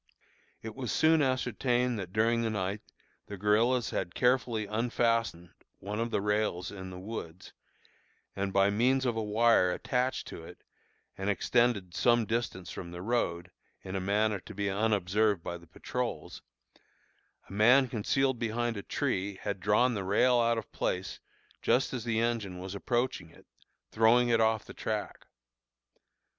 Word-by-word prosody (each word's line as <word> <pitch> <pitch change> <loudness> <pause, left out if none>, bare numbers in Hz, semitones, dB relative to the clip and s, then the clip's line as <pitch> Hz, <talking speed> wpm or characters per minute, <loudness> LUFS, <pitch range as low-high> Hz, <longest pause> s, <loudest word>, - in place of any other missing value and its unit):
It 110 -1 -6
was 130 -2 -4
soon 160 0 +4
ascertained 125 -2 0
that 90 -2 -6
during 115 +3 +2
the 115 - 0
night 100 -1 -2 0.5
the 100 - -7
guerillas 110 +4 +2
had 85 -2 -3
carefully 125 -3 +1
unfastened 115 -4 0 0.3
one 105 +2 -5
of 115 +1 -1
the 110 - 0
rails 105 -4 -1
in 95 -2 -8
the 90 - -8
woods, 95 -3 -8 0.8
and 100 0 -2
by 100 +1 +3
means 130 +5 +2
of 120 -2 0
a 110 - -1
wire 110 -3 +3
attached 125 +7 -1
to 80 - -9
it 90 +2 -13 0.6
and 95 +1 -1
extended 105 -2 +1
to - - -4
some 120 -2 +4
distance 110 -5 -3
from 85 - -7
the 85 +1 -8
road, 90 -6 -1 0.3
in 95 0 -6
a - - 0
manner 105 +2 +1
to - - -12
be 100 0 -1
unobserved 105 -2 +1
by 85 - -5
the 85 - -18
patrols, - - -5 1.1
a - - -11
man 125 +6 +5
concealed 125 +2 0
behind 115 0 -1
a - - -4
tree 100 0 -2
had 100 -2 -3
drawn 105 +6 +3
the 100 -3 -3
rail 120 +6 +3
out 115 0 +2
of 115 - -6
place 90 +1 -3 0.4
just 125 +3 +2
as 125 -3 -3
the 115 -1 0
engine 115 -6 -1
was 95 +1 -6
approaching 120 -3 -2
it, - - -19 0.5
throwing 120 +2 +4
it 115 -1 +3
off 110 -1 +2
the - - -10
track. 105 -2 -4
110 Hz, 160 wpm, -30 LUFS, 95-120 Hz, 1.1 s, man